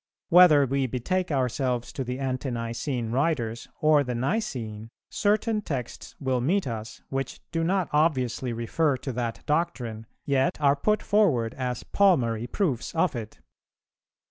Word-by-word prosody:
Whether 170 Hz, -5 st, +7 dB
we 135 Hz, 0 st, 0 dB
betake 180 Hz, +10 st, -1 dB
ourselves 130 Hz, -3 st, -1 dB
to 135 Hz, -, -3 dB
the 125 Hz, 0 st, -4 dB
Ante 130 Hz, 0 st, -2 dB
nicene 115 Hz, 0 st, -3 dB
writers 120 Hz, -5 st, -1 dB
or 150 Hz, -1 st, +5 dB
the 125 Hz, -2 st, -3 dB
Nicene, 120 Hz, -, -3 dB, 0.2 s
certain 215 Hz, +1 st, +1 dB
texts 130 Hz, -, -5 dB
will 130 Hz, -3 st, 0 dB
meet 180 Hz, +10 st, +1 dB
us, 110 Hz, -3 st, -6 dB
which 135 Hz, -1 st, -3 dB
do 165 Hz, -1 st, 0 dB
not 185 Hz, +1 st, +1 dB
obviously 130 Hz, -5 st, +1 dB
refer 130 Hz, +5 st, 0 dB
to 130 Hz, -, -5 dB
that 120 Hz, -2 st, -4 dB
doctrine, 125 Hz, -9 st, -2 dB, 0.2 s
yet 135 Hz, 0 st, +1 dB
are 140 Hz, -1 st, +4 dB
put 210 Hz, +9 st, +1 dB
forward 140 Hz, -, +2 dB
as 125 Hz, -2 st, -3 dB
palmary 120 Hz, -, +2 dB
proofs 155 Hz, -, -1 dB
of 165 Hz, -2 st, +2 dB
it. 110 Hz, -2 st, -7 dB
135 Hz, 145 wpm, -26 LUFS, 120-165 Hz, 0.2 s, Whether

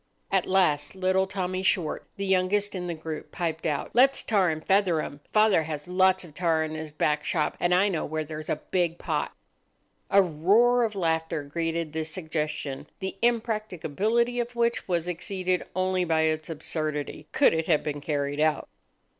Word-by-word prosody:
At 195 Hz, -2 st, +2 dB
last 180 Hz, -5 st, +2 dB
little 190 Hz, 0 st, +1 dB
Tommy 185 Hz, -1 st, -2 dB
Short, 180 Hz, -4 st, 0 dB
the 200 Hz, -, -2 dB
youngest 190 Hz, +2 st, +1 dB
in 180 Hz, -2 st, -4 dB
the 170 Hz, -, -3 dB
group, 155 Hz, -1 st, -7 dB
piped 165 Hz, -3 st, -2 dB
out,— 150 Hz, -2 st, -2 dB
"Let's 270 Hz, +3 st, +4 dB
tar 195 Hz, -5 st, +2 dB
and 155 Hz, 0 st, -4 dB
feather 190 Hz, -4 st, +3 dB
'em. 145 Hz, -1 st, -5 dB
Father 215 Hz, -5 st, +4 dB
has 150 Hz, -1 st, -5 dB
lots 185 Hz, +1 st, +3 dB
of 165 Hz, -4 st, -13 dB
tar 165 Hz, -2 st, +1 dB
in 155 Hz, 0 st, -4 dB
his 155 Hz, -1 st, -6 dB
back 150 Hz, 0 st, 0 dB
shop, 155 Hz, -4 st, 0 dB
and 175 Hz, -, +1 dB
I 185 Hz, +3 st, +4 dB
know 175 Hz, -6 st, -1 dB
where 155 Hz, +1 st, -2 dB
there's 155 Hz, 0 st, -7 dB
a -, -, +2 dB, 0.2 s
big 175 Hz, -2 st, +1 dB
pot." -, -, -2 dB, 0.8 s
A 200 Hz, -, +6 dB
roar 200 Hz, +9 st, +4 dB
of 215 Hz, -2 st, -1 dB
laughter 160 Hz, -4 st, -1 dB
greeted 165 Hz, +1 st, -3 dB
this 160 Hz, 0 st, -3 dB
suggestion, 155 Hz, -4 st, -3 dB
the 190 Hz, 0 st, -5 dB
impracticability 225 Hz, -, 0 dB
of 240 Hz, 0 st, -3 dB
which 235 Hz, 0 st, 0 dB
was 175 Hz, -2 st, 0 dB
exceeded 180 Hz, +1 st, -1 dB
only 185 Hz, 0 st, +1 dB
by 160 Hz, -2 st, +2 dB
its 155 Hz, 0 st, 0 dB
absurdity, 155 Hz, -1 st, -4 dB
could 275 Hz, -, +4 dB
it 160 Hz, 0 st, -1 dB
have 155 Hz, -3 st, +3 dB
been 145 Hz, -1 st, -3 dB
carried 145 Hz, -1 st, -2 dB
out. 155 Hz, 0 st, +1 dB
175 Hz, 180 wpm, -27 LUFS, 155-190 Hz, 0.8 s, A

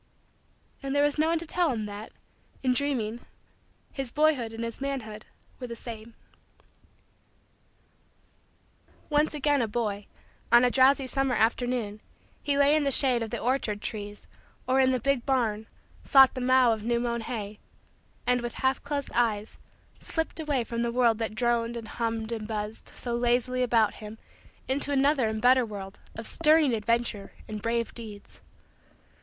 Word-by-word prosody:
And 275 Hz, 0 st, -3 dB
there 285 Hz, -, +4 dB
was 290 Hz, +1 st, +1 dB
no 310 Hz, -, +3 dB
one 335 Hz, +1 st, +2 dB
to 330 Hz, -, -3 dB
tell 345 Hz, +1 st, +1 dB
him 220 Hz, -4 st, -3 dB
that, 205 Hz, +1 st, -8 dB, 0.5 s
in 255 Hz, -1 st, +3 dB
dreaming, 245 Hz, -5 st, -1 dB, 0.7 s
his 270 Hz, -3 st, -4 dB
boyhood 295 Hz, -6 st, +2 dB
and 225 Hz, +1 st, -6 dB
his 230 Hz, +2 st, -5 dB
manhood 235 Hz, -6 st, -5 dB, 0.3 s
were 250 Hz, -, -5 dB
the 235 Hz, -, -6 dB
same. 230 Hz, -1 st, -9 dB, 3.0 s
Once 300 Hz, +1 st, +2 dB
again 290 Hz, -1 st, +2 dB
a 230 Hz, -, 0 dB
boy, 210 Hz, -2 st, -3 dB, 0.4 s
on 240 Hz, +1 st, +7 dB
a 245 Hz, -, +2 dB
drowsy 270 Hz, +1 st, +4 dB
summer 270 Hz, -1 st, 0 dB
afternoon, 225 Hz, -1 st, 0 dB, 0.4 s
he 285 Hz, -1 st, 0 dB
lay 285 Hz, +1 st, +5 dB
in 310 Hz, -, +2 dB
the 280 Hz, -, +1 dB
shade 260 Hz, -3 st, +4 dB
of 225 Hz, -, -3 dB
the -, -, -3 dB
orchard 240 Hz, -4 st, -1 dB
trees 205 Hz, -1 st, -6 dB, 0.4 s
or, 260 Hz, +1 st, +3 dB
in 260 Hz, 0 st, +4 dB
the 255 Hz, -, 0 dB
big 275 Hz, -1 st, 0 dB
barn, 225 Hz, -5 st, 0 dB, 0.4 s
sought 270 Hz, -2 st, +6 dB
the 255 Hz, -, -5 dB
mow 255 Hz, -1 st, +4 dB
of 220 Hz, -, -5 dB
new 235 Hz, +2 st, 0 dB
mown 235 Hz, -1 st, -2 dB
hay, 215 Hz, -3 st, -5 dB, 0.7 s
and, 250 Hz, 0 st, +2 dB
with 240 Hz, -1 st, -5 dB
half 265 Hz, 0 st, 0 dB
closed 285 Hz, -1 st, -3 dB
eyes, 220 Hz, -3 st, 0 dB, 0.4 s
slipped 325 Hz, 0 st, -3 dB
away 290 Hz, -5 st, 0 dB
from 235 Hz, +1 st, -4 dB
the 235 Hz, 0 st, 0 dB
world 235 Hz, -2 st, +2 dB
that 220 Hz, -1 st, -3 dB
droned 235 Hz, 0 st, 0 dB
and 225 Hz, -1 st, -7 dB
hummed 225 Hz, -1 st, -3 dB
and 220 Hz, -2 st, -4 dB
buzzed 215 Hz, 0 st, -4 dB
so 240 Hz, -1 st, -4 dB
lazily 245 Hz, +1 st, +1 dB
about 230 Hz, -4 st, +3 dB
him 215 Hz, +1 st, -9 dB, 0.5 s
into 280 Hz, +2 st, 0 dB
another 275 Hz, -2 st, +3 dB
and 220 Hz, 0 st, -3 dB
better 255 Hz, +1 st, +6 dB
world 200 Hz, -3 st, -8 dB, 0.2 s
of 225 Hz, -, -7 dB
stirring 310 Hz, -3 st, +3 dB
adventure 225 Hz, -2 st, -1 dB
and 215 Hz, -1 st, -6 dB
brave 230 Hz, +1 st, -1 dB
deeds. 215 Hz, -3 st, -10 dB
240 Hz, 165 wpm, -27 LUFS, 220-270 Hz, 3.0 s, on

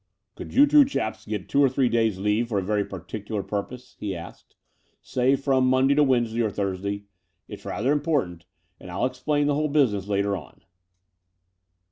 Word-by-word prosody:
Could -, -, -8 dB
you 280 Hz, +3 st, +8 dB
two 295 Hz, 0 st, +6 dB
chaps 185 Hz, -, -3 dB
get 105 Hz, -3 st, -4 dB
two 140 Hz, -, +2 dB
or 135 Hz, -, +5 dB
three 130 Hz, 0 st, +1 dB
days' 115 Hz, -4 st, +1 dB
leave 105 Hz, +4 st, 0 dB
for 105 Hz, -, -1 dB
a 95 Hz, -, 0 dB
very 105 Hz, +1 st, 0 dB
particular 100 Hz, +3 st, -6 dB
purpose," 115 Hz, +6 st, -6 dB
he 100 Hz, -3 st, -3 dB
asked 85 Hz, -1 st, -11 dB, 0.3 s
— -, -, -43 dB
"say 130 Hz, +2 st, +2 dB
from 135 Hz, -1 st, +1 dB
Monday 130 Hz, +2 st, +4 dB
to 150 Hz, +1 st, +4 dB
Wednesday 120 Hz, -4 st, +1 dB
or 110 Hz, -, +1 dB
Thursday? 100 Hz, 0 st, -3 dB, 0.4 s
Ittfi^rather 125 Hz, +6 st, -3 dB
important; 140 Hz, -, -1 dB, 0.3 s
and -, -, -12 dB
111 110 Hz, +8 st, -1 dB
explain 145 Hz, +3 st, 0 dB
the 145 Hz, -, +2 dB
whole 150 Hz, +2 st, 0 dB
business 115 Hz, -10 st, +1 dB
later 100 Hz, 0 st, 0 dB
on." 75 Hz, -9 st, -11 dB
115 Hz, 175 wpm, -25 LUFS, 100-135 Hz, 0.4 s, you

